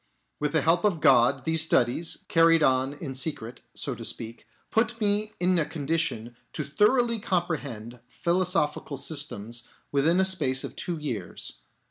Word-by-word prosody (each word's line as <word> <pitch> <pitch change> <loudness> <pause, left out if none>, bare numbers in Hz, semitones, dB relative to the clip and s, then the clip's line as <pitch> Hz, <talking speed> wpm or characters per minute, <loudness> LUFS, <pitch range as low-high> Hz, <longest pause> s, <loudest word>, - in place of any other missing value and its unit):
With 150 0 -1
the 160 -3 +2
help 170 +2 +3
of 200 -6 +2
God, 130 0 +4
these 160 0 +3
studies, 160 +1 +1
carried 165 -1 +4
on 130 0 +2
in 145 -2 -7
secret, 130 -4 -2
so - - -2
to - - -8
speak, 115 0 -6 0.2
put 230 +1 +1
me 210 0 0
in 180 0 +2
a - - +2
condition 145 -6 -2 0.2
to 150 - -3
thoroughly 230 - +2
comprehend 145 - -3
philosophical 170 -2 0
systems 130 -6 -4 0.3
within 155 +6 +3
a 190 - +4
space 150 -9 +1
of - - -7
two 175 -2 -3
years. 115 - -6
155 Hz, 150 wpm, -26 LUFS, 130-175 Hz, 0.3 s, God